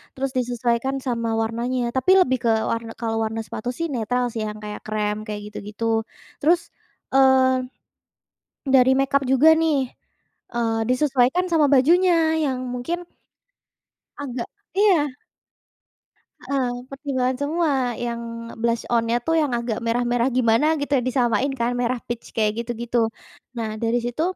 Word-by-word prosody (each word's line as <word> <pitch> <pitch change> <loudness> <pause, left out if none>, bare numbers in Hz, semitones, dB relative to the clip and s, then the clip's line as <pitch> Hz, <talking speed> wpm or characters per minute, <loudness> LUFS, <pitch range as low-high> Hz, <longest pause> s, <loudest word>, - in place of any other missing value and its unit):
Terus, 270 0 -2
disesuaikan 245 +1 0
sama 235 -3 -2
warnanya, 235 +3 -1
tapi 260 +8 +3
lebih 260 -6 +2
ke 235 - +2 0.2
warn 230 0 -2
kalau 225 -1 -1
warna 220 +1 -3
sepatu 240 - -5
sih 335 - -1
netral 245 +2 0
sih, 225 - -2
yang 210 0 -6
kayak 210 0 -6
krem, 210 -1 -1
kayak 210 -1 -4
gitu-gitu. 225 +2 -2 0.4
Terus, 335 +4 +5 0.6
eee, 260 -1 +5 1.1
dari 260 -1 +6
make-up 275 +1 +2
juga 265 +4 +6
nih, 320 -2 +2 0.8
eee, 225 -1 0
disesuaikan 265 +5 +2
sama 310 -3 +4
bajunya, 345 +7 +5 0.3
yang 265 -3 -1 0.2
mungkin 340 +8 -4 1.1
agak 250 -4 -4 0.3
iya. 360 -9 +3 1.3
Heeh, 265 -3 -1 0.2
pertimbangan 265 -2 -1
semua, 315 +2 +1 0.3
yang 235 -1 -3 0.4
blush-on-nya 230 0 +1
tuh, 325 - +2
yang 290 -4 -1
agak 235 -2 -2
merah-merah 240 +1 +1
gimana, 235 +3 +3
gitu 285 0 -4
ya, - - -1
disamain 250 +1 +1
kan, 235 +1 +2
merah 245 +1 0
peach, 240 -1 -5
kayak 215 -2 +2
gitu-gitu. 235 0 -2 0.6
Nah, 225 -1 -2
dari 230 +1 +2
situ 240 +6 -2
245 Hz, 135 wpm, -23 LUFS, 230-275 Hz, 1.3 s, dari